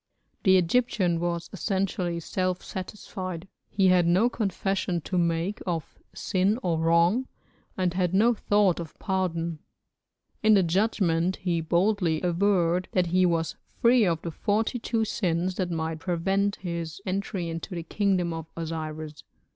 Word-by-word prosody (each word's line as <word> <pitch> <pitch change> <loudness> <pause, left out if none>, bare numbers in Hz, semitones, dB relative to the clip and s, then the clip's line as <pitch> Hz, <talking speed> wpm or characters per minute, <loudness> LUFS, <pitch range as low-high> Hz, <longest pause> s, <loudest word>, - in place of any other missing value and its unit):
The 190 -1 +5
Egyptian 185 -2 +1
was 170 0 -2
essentially 185 -2 -1
self 185 +2 -2
satisfied, 185 -2 -6 0.2
he 195 -2 +3
had 180 -2 +4
no 190 +8 +4
confession 195 -4 -1
to 185 - -5
make 170 +3 0
of 165 -3 -4 0.2
sin 195 +3 +1
or 170 -3 0
wrong, 170 +10 +3 0.5
and 180 -2 +1
had 180 -2 +1
no 220 +6 +4
thought 205 -4 +2
of 165 -2 -8
pardon. 170 -4 -2 0.8
In 215 0 +6
the 195 - +4
judgment 180 -1 +1
he 175 -3 -1
boldly 175 0 +1
averred 180 -1 +2
that 180 -1 +3
he 185 0 +5
was 165 -1 -1 0.2
free 240 0 +5
of 170 -4 +1
the 170 - -3
forty 215 - 0
two 225 -1 0
sins 180 -3 -1
that 185 -2 -1
might 160 -1 -2
prevent 195 +4 0
his 170 -2 -5
entry 190 -2 -2
into 165 +3 -5
the 170 - -4
kingdom 185 -2 0
of 165 -1 -6
Osiris. 155 -2 -5
180 Hz, 145 wpm, -27 LUFS, 170-195 Hz, 0.8 s, In